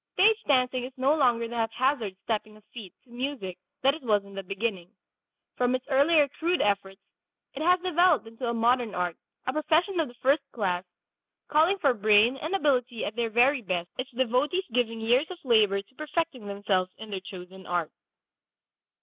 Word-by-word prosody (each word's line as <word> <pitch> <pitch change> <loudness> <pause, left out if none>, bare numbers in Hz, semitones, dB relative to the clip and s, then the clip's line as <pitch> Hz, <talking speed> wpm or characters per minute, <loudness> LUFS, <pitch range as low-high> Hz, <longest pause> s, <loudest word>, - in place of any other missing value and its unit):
Stage 430 +3 +5
dancing 255 -2 +2
is 255 - -6
no 265 +3 +3
longer 240 -6 +2
the 240 - -7
haphazard 230 -2 0
stepping 215 -1 -3
of 215 - -21
feet 215 -7 -9
to 245 - -24
music 240 -8 -5 0.2
that 275 +1 +5
it 315 - -8
was 210 -5 +1
in 200 - -14
the 195 - -5
beginning. 195 -2 -4 0.7
From 250 0 +2
its 255 - -5
earlier 290 +2 +4
crude 340 +6 -1
efforts 195 -1 0 0.5
it 285 - -6
has 360 +3 +4
developed 355 -6 +3
into 230 +2 -6
a 235 - 0
modern 235 -1 +1
art, 180 -2 -1 0.3
a 255 - -1
profession 325 +5 +1
of 320 - +1
the 245 - -14
first 275 +5 +2
class, 185 -5 -1 0.7
calling 320 +6 +3
for 280 -8 +2
brain 215 +2 +4
and 310 +8 -3
ability 255 - 0
at 210 - -5
their 235 -1 -1
very 250 +4 +3
best, 175 -4 -3
its 255 +1 -3
devotees 260 +9 0
giving 230 -2 0
years 245 +7 +2
of 370 - -7
labor 215 -5 +4
to 205 - -31
perfecting 300 -5 -3
themselves 200 -2 -1
in 220 -1 -10
their 195 - -3
chosen 185 0 -11
art. 175 -3 -1
245 Hz, 185 wpm, -27 LUFS, 205-285 Hz, 0.7 s, Stage